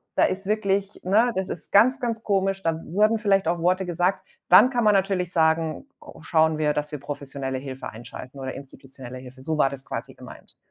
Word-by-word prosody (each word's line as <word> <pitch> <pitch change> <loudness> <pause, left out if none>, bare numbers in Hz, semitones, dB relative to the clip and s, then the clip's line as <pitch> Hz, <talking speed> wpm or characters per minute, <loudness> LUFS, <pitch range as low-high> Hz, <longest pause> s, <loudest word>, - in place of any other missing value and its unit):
da - - +4
ist 190 +1 -2
wirklich 200 -1 -1
Ne, 220 +6 +3
das 190 0 -1
ist - - -7
ganz, 255 +7 +5
ganz 230 -2 -2
komisch. 195 -1 0
Da 165 -1 -1
wurden 215 +6 +2
vielleicht 195 -4 +2
auch 170 +1 +1
Worte 185 +2 +1
gesagt. 175 +2 0 0.3
Dann 255 - +8
kann 245 -3 0
man 210 -1 +5
natürlich 190 -2 0
sagen, 160 - +1
o - - -13
schauen 160 -1 +2
wir, 150 -1 +1
dass 150 +1 -3
wir 150 - -5
professionelle 140 -2 -5
Hilfe 135 0 -7
einschalten 120 +4 -10
oder 130 -1 -5
institutionelle 135 -2 -11
Hilfe. 130 +1 -13
So 155 +2 -2
war 135 - +3
das 135 -1 -9
quasi - - -6
gemeint, - - -14
170 Hz, 200 wpm, -24 LUFS, 140-195 Hz, 0.3 s, Dann